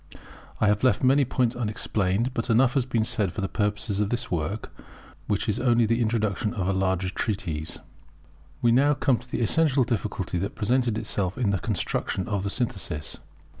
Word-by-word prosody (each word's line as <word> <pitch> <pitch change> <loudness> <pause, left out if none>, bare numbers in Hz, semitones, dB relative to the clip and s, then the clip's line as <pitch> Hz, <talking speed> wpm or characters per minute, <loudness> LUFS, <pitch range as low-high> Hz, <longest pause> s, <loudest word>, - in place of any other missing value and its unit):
I - - +3
have 105 +1 +2
left 125 -3 +3
many 135 +2 +4
points 125 -1 0
unexplained; 110 0 -1
but 115 0 -3
enough 120 +3 +4
has 135 -3 +1
been 115 -3 +1
said 100 -5 0
for 100 - -5
the 95 - 0
purpose 105 0 -1
of 105 -1 +1
this 120 +1 -2
work, 85 +5 -3 0.5
which 105 -3 -1
is 105 - 0
only 120 -2 +3
the 115 +2 +1
introduction 110 -1 0
to 105 - -3
a 95 +2 +1
larger 95 -1 0
treatise. 90 -9 -2 0.9
We 120 - +5
now 140 +5 +4
come 130 -3 +2
to 125 - -16
the - - -2
essential 140 +2 +3
difficulty 100 -6 -2
that 100 - -3
presented 120 0 +1
itself 100 -3 -1
in 115 -6 +1
the 100 - 0
construction 95 0 -2
of 100 -4 -1
the 100 - -1
Synthesis. 95 - -3
110 Hz, 185 wpm, -26 LUFS, 100-120 Hz, 0.9 s, We